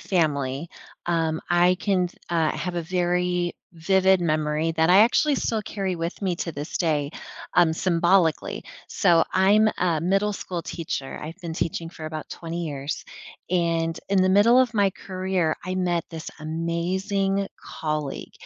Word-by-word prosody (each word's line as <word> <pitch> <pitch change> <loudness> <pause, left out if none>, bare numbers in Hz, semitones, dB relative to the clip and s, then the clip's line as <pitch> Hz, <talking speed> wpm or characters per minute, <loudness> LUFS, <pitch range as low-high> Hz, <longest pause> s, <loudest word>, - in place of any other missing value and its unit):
family, 145 -4 0 0.4
um, 165 -2 0
I 175 +1 +4
can 185 -3 +1
th - - -21
uh, 165 -3 +2
I - - -6
have 180 -1 -3
a 170 - -1
very 180 0 0 0.2
vivid 190 +2 +3
memory 155 0 0
that 160 0 +2
I 185 +2 +7
actually 275 +6 +4
still 225 -3 -1
carry 195 -4 -3
with 170 +4 -4
me 185 -2 +1
to 170 - -3
this 145 +3 -5
day, 150 -4 0 0.4
um, 170 -2 +5
symbolically, 170 -1 +2 0.2
so 170 -5 +4
I'm 205 +3 +5
a 170 -4 +1
middle-school 190 -1 -1
teacher- 155 -5 -5
I've 160 +4 -7
been 170 -2 -4
teaching 165 0 -3
for 160 -2 -8
about 155 -1 -6
20 170 0 -5
years- 140 -1 -4 0.5
and 165 -2 0
in 195 -1 +3
the 185 - +3
middle 205 +6 +6
of 245 -3 +3
my 200 -2 +3
career, 185 -4 -1
I 185 +1 -3
met 175 -2 0
this 160 -1 -7
amazing 190 +5 -1 0.3
colleague. 155 -3 -3
175 Hz, 155 wpm, -24 LUFS, 160-190 Hz, 0.5 s, I